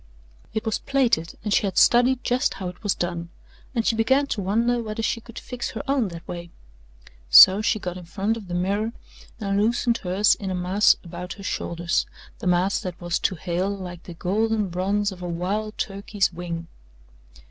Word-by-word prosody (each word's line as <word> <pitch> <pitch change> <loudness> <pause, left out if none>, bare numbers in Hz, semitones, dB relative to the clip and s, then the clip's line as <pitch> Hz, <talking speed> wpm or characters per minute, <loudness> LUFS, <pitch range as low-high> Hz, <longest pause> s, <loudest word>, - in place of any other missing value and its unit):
It 220 - -3
was 220 - 0
plaited 245 -12 +1
and 210 -1 0
she 200 - +3
had 190 - -4
studied 245 +1 +5
just 245 -3 +1
how 190 -2 -4
it 180 - -12
was 205 -4 0
done 170 -1 -3 0.5
and 230 -1 0
she 225 - +2
began 265 +6 +3
to 205 - -4
wonder 230 +5 +1
whether 220 0 -4
she 230 - -1
could 235 0 -13
fix 250 -1 -5
her 220 - -6
own 270 -5 +2
that 170 -2 -9
way. 175 -1 -6 0.8
So 185 - +9
she 215 +1 +1
got 180 -3 -5
in 180 - -10
front 200 +5 -1
of 215 -4 -9
the 175 - -4
mirror 200 +5 0 0.5
and 200 -1 0
loosened 235 +1 +1
hers 195 +3 +3
in 195 - -5
a 185 - -2
mass 185 +4 +4
about 180 +1 -7
her 200 - -12
shoulders 170 -2 -1 0.3
the - - -4
mass 180 +2 +2
that 180 -2 -6
was 175 -1 -1
to 190 - 0
Hale 180 +3 -2
like 180 -3 -6
the 175 - -10
golden 210 +3 0
bronze 200 +4 0
of 185 -1 -10
a 175 - -4
wild 200 +6 -2
turkey's 200 -1 -1
wing. 170 -1 -5
195 Hz, 195 wpm, -24 LUFS, 180-220 Hz, 0.8 s, So